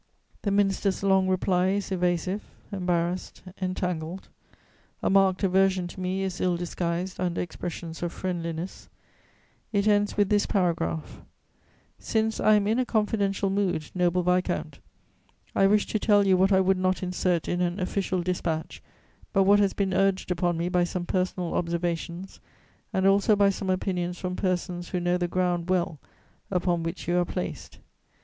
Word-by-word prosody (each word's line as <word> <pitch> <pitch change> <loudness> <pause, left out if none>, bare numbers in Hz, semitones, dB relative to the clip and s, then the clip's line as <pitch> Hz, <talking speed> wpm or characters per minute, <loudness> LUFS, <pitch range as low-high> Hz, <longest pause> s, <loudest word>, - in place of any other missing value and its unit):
The 205 - -1
minister's 195 -1 +1
long 190 -1 +3
reply 185 -1 +2
is 200 +1 -1
evasive, 180 +2 0 0.3
embarrassed, 180 -2 -2 0.2
entangled; 180 -1 -3 0.7
a - - +2
marked 195 0 +3
aversion 190 -1 +3
to 185 - -10
me 185 +1 -1
is 185 -2 -3
ill 180 -1 +1
disguised 175 +1 -3
under 180 -2 -1
expressions 170 -1 -5
of 175 -1 -2
friendliness; 170 -1 -4 0.8
it 200 -1 +1
ends 205 0 +2
with 205 -1 +3
this 205 -1 +2
paragraph: 165 - -1 0.8
"Since 220 0 0
I 215 - +5
am 205 -1 +2
in 220 +4 +1
a - - +3
confidential 205 -4 0
mood, 190 -6 -1
noble 180 0 +1
viscount, 180 +1 0 0.7
I 195 - +4
wish 210 +1 +3
to 215 - -1
tell 205 -1 +4
you 190 -1 +5
what 190 +2 +3
I 190 -1 +5
would 190 0 +2
not 185 0 0
insert 180 -2 0
in 175 0 -1
an 175 +2 -1
official 185 -1 -1
dispatch, 170 -3 -3 0.5
but 195 -2 +4
what 200 +2 +5
has 200 -2 +2
been 195 -2 -1
urged 195 -1 +1
upon 175 -1 0
me 170 +1 -1
by 180 0 +2
some 175 0 -3
personal 180 -1 -1
observations 170 +1 -3 0.5
and 190 -3 0
also 200 +2 +4
by 200 -1 +4
some 195 0 -4
opinions 180 -1 -1
from 180 0 -3
persons 180 -2 -2
who 180 - -1
know 175 0 +1
the 175 - 0
ground 175 -1 -1
well 175 -4 0 0.5
upon 175 -2 0
which 165 +2 -5
you 175 +1 +2
are - - +3
placed. - - -5
185 Hz, 160 wpm, -26 LUFS, 175-195 Hz, 0.8 s, I